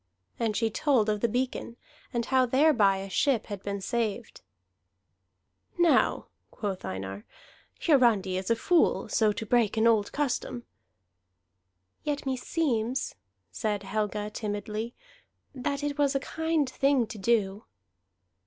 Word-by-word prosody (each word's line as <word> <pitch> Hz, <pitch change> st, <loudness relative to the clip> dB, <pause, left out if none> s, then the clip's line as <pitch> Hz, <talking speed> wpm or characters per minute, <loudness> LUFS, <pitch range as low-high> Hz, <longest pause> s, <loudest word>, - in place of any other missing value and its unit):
And 225 Hz, -3 st, 0 dB
she 225 Hz, -1 st, +1 dB
told 245 Hz, -4 st, +2 dB
of 210 Hz, -1 st, 0 dB
the 235 Hz, -, +3 dB
beacon, 245 Hz, 0 st, -2 dB, 0.3 s
and 235 Hz, -1 st, -1 dB
how 260 Hz, -1 st, +3 dB
thereby 245 Hz, -7 st, +4 dB
a 195 Hz, +1 st, -5 dB
ship 240 Hz, +3 st, +1 dB
had 205 Hz, -3 st, -6 dB
been 200 Hz, 0 st, -4 dB
saved. 230 Hz, 0 st, -3 dB, 1.4 s
"Now," 345 Hz, -2 st, +3 dB, 0.2 s
quoth 200 Hz, -3 st, -4 dB
Einar, 95 Hz, +2 st, -5 dB, 0.6 s
"Hiarandi 235 Hz, -, +3 dB
is 185 Hz, 0 st, -3 dB
a 230 Hz, -, +4 dB
fool, 335 Hz, +9 st, +2 dB
so 215 Hz, -2 st, +3 dB
to 210 Hz, +2 st, -5 dB
break 225 Hz, -1 st, +2 dB
an 220 Hz, -, +3 dB
old 220 Hz, -3 st, +3 dB
custom." 255 Hz, -3 st, -2 dB, 1.4 s
"Yet 290 Hz, -1 st, -2 dB
meseems," 260 Hz, -2 st, -1 dB, 0.4 s
said 210 Hz, -2 st, -2 dB
Helga 210 Hz, +1 st, -2 dB
timidly, 210 Hz, +2 st, -4 dB, 0.6 s
"that 280 Hz, +2 st, -3 dB
it 290 Hz, 0 st, -2 dB
was 280 Hz, -1 st, +2 dB
a -, -, +3 dB
kind 320 Hz, 0 st, -1 dB
thing 270 Hz, -1 st, +2 dB
to 215 Hz, -, -9 dB
do." 205 Hz, -1 st, +1 dB
230 Hz, 130 wpm, -28 LUFS, 205-265 Hz, 1.4 s, thereby